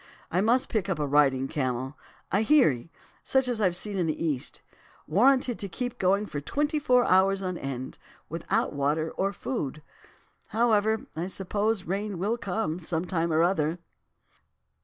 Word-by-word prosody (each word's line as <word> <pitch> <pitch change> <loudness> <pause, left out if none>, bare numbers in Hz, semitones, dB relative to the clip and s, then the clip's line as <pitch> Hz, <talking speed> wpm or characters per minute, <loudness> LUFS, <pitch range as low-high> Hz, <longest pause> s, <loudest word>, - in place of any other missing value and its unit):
I 180 - +2
must 240 +5 +3
pick 205 -4 -1
up 190 - 0
a 150 - -1
riding 135 -2 +3
camel, 130 -1 -2 0.4
a - - +3
"heirie," 165 - +4 0.3
such 265 -1 +2
as 240 -3 0
I've 185 -4 +2
seen 200 +2 -2
in 170 - +1
the 155 - -2
East, 145 -6 -2 0.4
warranted 250 - +3
to 200 - -4
keep 245 +6 -4
going 195 +3 +2
for 145 -8 -5
twenty 295 - 0
four 250 -3 +3
hours 195 +1 +3
on 185 -1 -2
end, 130 -4 -5 0.3
without 180 +7 -1
water 150 +3 0
or 195 +1 -1
food. 155 - -4 0.6
However, 220 -1 +2
I 165 +3 -2
suppose 205 +2 -1
rain 200 +2 -3
will 210 +7 0
come 190 -5 -2
some 165 0 -2
time 170 -2 -1
or 160 +1 +3
other. 170 -2 +1
185 Hz, 160 wpm, -27 LUFS, 155-220 Hz, 0.6 s, heirie